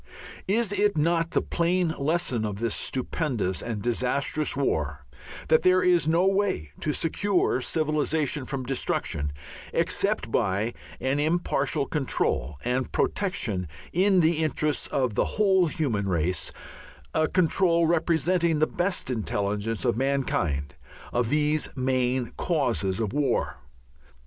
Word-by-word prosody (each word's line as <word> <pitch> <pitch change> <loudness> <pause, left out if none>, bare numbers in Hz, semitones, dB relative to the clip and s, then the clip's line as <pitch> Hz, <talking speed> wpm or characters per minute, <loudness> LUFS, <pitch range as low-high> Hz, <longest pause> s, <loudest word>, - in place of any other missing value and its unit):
Is 215 +1 +2
it 205 -3 +1
not 165 +2 +2
the - - 0
plain 175 +1 +1
lesson 140 -5 0
of 105 -2 -3
this 115 +1 -1
stupendous 125 - -1
and 110 -4 -4
disastrous 130 +5 0
war 75 - -1 0.4
that 160 - +4
there 185 0 +4
is 175 -4 +3
no 170 +3 +3
way 195 - 0
to 150 - -1
secure 175 -2 +1
civilization 150 -2 0
from 135 -2 -3
destruction 120 - -1 0.4
except - - 0
by 100 +5 0 0.3
an 135 +2 0
impartial 150 -3 0
control 75 - -1
and 125 +1 -1
protection 125 - -1 0.3
in 185 +1 +4
the 160 0 +3
interests 155 -1 0
of 130 -5 0
the - - +1
whole 190 -4 +4
human 125 -11 -1
race, 85 -2 0 0.6
a 155 0 +2
control 170 -1 +3
representing 170 0 +2
the 155 - +3
best 175 -5 -1
intelligence 105 -2 -2
of - - +2
mankind, 120 - -1 0.4
of 120 -2 +1
these 150 +1 +1
main 130 -2 0
causes 120 - 0
of 110 -3 -2
war. 145 -2 0
145 Hz, 125 wpm, -26 LUFS, 115-170 Hz, 0.6 s, that